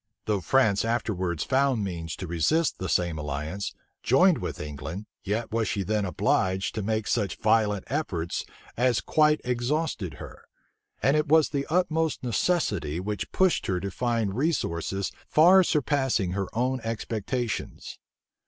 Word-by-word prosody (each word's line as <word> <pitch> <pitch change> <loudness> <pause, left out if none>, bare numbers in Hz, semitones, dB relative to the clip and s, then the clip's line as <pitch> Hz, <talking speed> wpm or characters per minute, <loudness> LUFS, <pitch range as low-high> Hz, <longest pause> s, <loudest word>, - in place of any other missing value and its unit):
Though 105 -3 0
France 110 0 +3
afterwards 95 -8 -1
found 135 -4 +1
means 85 -4 -4
to 95 - -6
resist 90 - +1
the 95 - -3
same 85 -3 0
alliance, 75 +7 -4 0.3
joined 175 +7 +4
with - - -5
England, 75 +6 -6 0.2
yet 110 +3 -2
was 115 -1 0
she 100 - -1
then 105 +1 0
obliged 95 +1 0
to 110 - -3
make 110 +1 -1
such 105 -3 0
violent 105 -2 +2
efforts 95 - -2 0.3
as 120 -1 +2
quite 150 0 +3
exhausted 125 - -1
her; - - -11 0.6
and 135 +5 +4
it 150 - +1
was 155 +1 +5
the 140 -2 -2
utmost 160 -3 0
necessity 105 - 0
which 100 +1 -4
pushed 190 -2 +2
her 90 -1 0
to 100 +1 -4
find 115 -3 -1
resources 100 - -1 0.2
far 180 +5 +6
surpassing 135 - +1
her 95 0 -2
own 125 +3 0
expectations. 115 +1 -4
110 Hz, 145 wpm, -27 LUFS, 95-135 Hz, 0.6 s, far